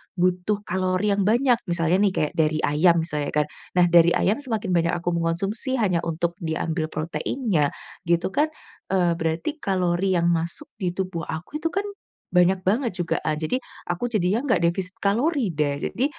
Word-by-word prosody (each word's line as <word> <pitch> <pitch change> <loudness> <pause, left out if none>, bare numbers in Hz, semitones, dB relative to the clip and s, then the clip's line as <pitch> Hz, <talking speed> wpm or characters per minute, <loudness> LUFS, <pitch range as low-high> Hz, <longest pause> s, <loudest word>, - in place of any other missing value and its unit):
butuh 185 +3 0
kalori 185 +1 0
yang 200 -1 +1
banyak, 240 +2 +3
misalnya 170 +1 +2
nih 200 -2 +3
kayak 150 - 0
dari 155 0 +2
ayam 165 +3 +3
misalnya 150 -3 -3
kan. - - -9 0.3
Nah, 180 -1 +6
dari 170 0 +6
ayam 210 +8 +1
semakin 220 -8 -2
banyak 170 -1 +2
aku 175 0 -2
mengkonsumsi 175 +10 -1
hanya 195 -8 +1
untuk 170 +1 -2
diambil 160 0 -2
proteinnya, 165 - -1 0.4
gitu 170 +2 +1
kan. 295 +8 +2 0.5
Eee, 180 -2 +3
berarti 165 - -2
kalori 185 0 +1
yang 170 0 +3
masuk 170 - -2
di 180 -2 -2
tubuh 185 -4 -3
aku 175 - -5
itu 330 - 0
kan, 395 - 0 0.5
banyak 180 +1 +4
banget 230 +5 +1
juga, 175 -2 0
eee. 155 -1 0
Jadi, 255 - 0 0.3
aku 180 +8 -1
jadinya 210 0 +1
enggak 245 - +2
defisit 185 +2 -2
kalori 235 - +1
deh, 145 -2 0
jadi 255 - -1
180 Hz, 170 wpm, -24 LUFS, 170-210 Hz, 0.5 s, Nah